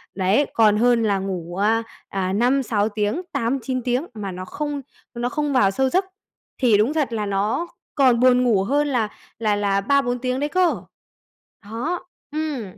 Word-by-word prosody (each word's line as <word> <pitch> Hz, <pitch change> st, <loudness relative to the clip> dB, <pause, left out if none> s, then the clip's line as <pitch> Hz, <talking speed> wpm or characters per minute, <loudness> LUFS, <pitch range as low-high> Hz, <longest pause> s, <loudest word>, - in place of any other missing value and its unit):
đấy, 195 Hz, +9 st, +2 dB
còn 215 Hz, -2 st, +4 dB
hơn 240 Hz, 0 st, +3 dB
là 200 Hz, -3 st, +1 dB
ngủ, 180 Hz, -3 st, -4 dB
a, 225 Hz, +3 st, +2 dB, 0.3 s
à, 190 Hz, -1 st, -2 dB
5-6 235 Hz, -2 st, +1 dB
tiếng, 210 Hz, -, -1 dB
8-9 255 Hz, 0 st, -1 dB
tiếng 250 Hz, +5 st, 0 dB
mà 205 Hz, -3 st, -5 dB
nó 185 Hz, +1 st, -6 dB
không 290 Hz, +6 st, -4 dB, 0.3 s
nó 240 Hz, 0 st, -2 dB
không 295 Hz, +1 st, -1 dB
vào 200 Hz, -7 st, +4 dB
sâu 265 Hz, +5 st, +1 dB
giấc 375 Hz, +6 st, +1 dB, 0.5 s
thì 235 Hz, -5 st, +4 dB
đúng 225 Hz, +8 st, +2 dB
thật 295 Hz, -7 st, 0 dB
là 215 Hz, -2 st, -1 dB
nó 205 Hz, -, -1 dB, 0.3 s
còn 255 Hz, -5 st, +4 dB
buồn 250 Hz, 0 st, +5 dB
ngủ 215 Hz, -6 st, +3 dB
hơn 290 Hz, +7 st, +1 dB
là 235 Hz, -6 st, 0 dB, 0.3 s
là 215 Hz, -2 st, +1 dB
là 200 Hz, -1 st, +1 dB
3-4 250 Hz, +1 st, +1 dB
tiếng 255 Hz, +1 st, -1 dB
đấy 290 Hz, +1 st, -1 dB
cơ. 365 Hz, 0 st, +1 dB, 0.8 s
Đó, 240 Hz, +12 st, -4 dB, 0.3 s
ừm. 305 Hz, -5 st, -2 dB
235 Hz, 175 wpm, -22 LUFS, 205-275 Hz, 0.8 s, buồn